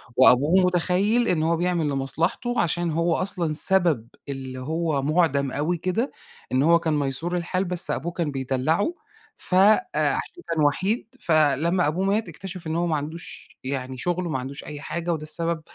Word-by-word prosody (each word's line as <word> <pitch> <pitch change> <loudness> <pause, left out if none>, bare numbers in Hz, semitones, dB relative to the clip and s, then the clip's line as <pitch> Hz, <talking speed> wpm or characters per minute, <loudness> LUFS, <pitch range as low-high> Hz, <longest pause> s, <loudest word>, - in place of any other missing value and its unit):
وأبوه 145 +9 +5
مُتخيّل 185 +6 +2
إن 160 -3 +1
هو 165 +1 +2
بيعمل 175 -3 0
لمصلحته 155 - -1
عشان 170 0 0
هو 165 +1 +1
أصلًا 175 -4 -1
سبب 165 -8 +2 0.2
اللي 130 -2 -5
هو 155 +1 -1
مُعدَم 140 -2 +1
أوي 155 +6 -1
كده، 185 - -1 0.4
إن 130 +1 +2
هو 170 +2 +5
كان 160 -2 -1
مَيسور 145 +6 -1
الحال 185 +2 -1
بس 180 -1 -1
أبوه 170 +6 -2
كان 170 -3 -2
بيدلّعه. 135 - 0 0.5
ف 180 - -2
أ 200 +3 +6 0.2
عشان 355 - -1
كان 160 -2 +1
وَحِيد 210 - 0
فلمّا 155 - +2
أبوه 175 +6 0
مات، 205 +3 0
اكتشف 185 -3 -8
إنه 160 +1 -1
هو 175 - 0
ما 160 - +1
عندوش 155 +4 -8
يعني 130 -1 -4
شغل 175 +5 -1
وما 155 -5 -2
عندوش 135 +2 -7
أي 145 -1 -8
حاجة 170 +2 -2
وده 155 -2 -4
السبب 165 +2 -2
165 Hz, 170 wpm, -24 LUFS, 145-180 Hz, 0.5 s, أ